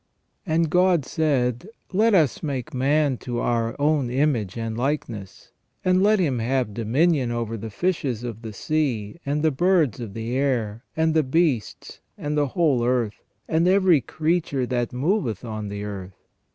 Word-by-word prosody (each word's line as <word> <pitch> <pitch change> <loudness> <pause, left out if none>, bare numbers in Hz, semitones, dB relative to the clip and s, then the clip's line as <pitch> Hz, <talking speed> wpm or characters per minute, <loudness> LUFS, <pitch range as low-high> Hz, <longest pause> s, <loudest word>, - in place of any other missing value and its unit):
"And 160 -1 +1
God 180 -5 +3
said: 130 - 0 0.2
Let 215 +2 +4
us 155 -8 +2
make 145 0 -4
man 140 +1 +2
to 120 -1 -5
our 115 -1 0
own 145 -3 +2
image 125 -7 0
and 115 -1 -3
likeness; 120 -7 -4 0.3
and 185 0 +4
let 210 +2 +4
him 145 - +1
have 120 -2 0
dominion 130 +5 +1
over 115 -1 -2
the 110 0 -6
fishes 135 - -1
of 115 -2 -6
the 110 -2 -6
sea, 130 0 -2
and 150 +2 0
the 160 - +4
birds 160 - +2
of 110 -5 -7
the 115 +2 -3
air, 120 -5 -1
and 160 0 +2
the 160 - +4
beasts, 145 -4 -1 0.2
and 150 0 -3
the 145 -1 +2
whole 145 -8 +3
earth, 120 -4 0 0.3
and 165 +2 +2
every 185 -5 +4
creature 155 0 -1
that 120 -1 -1
moveth 130 - -1
on 110 -2 -5
the 100 0 -5
earth." 95 -3 -7
130 Hz, 165 wpm, -24 LUFS, 115-160 Hz, 0.3 s, Let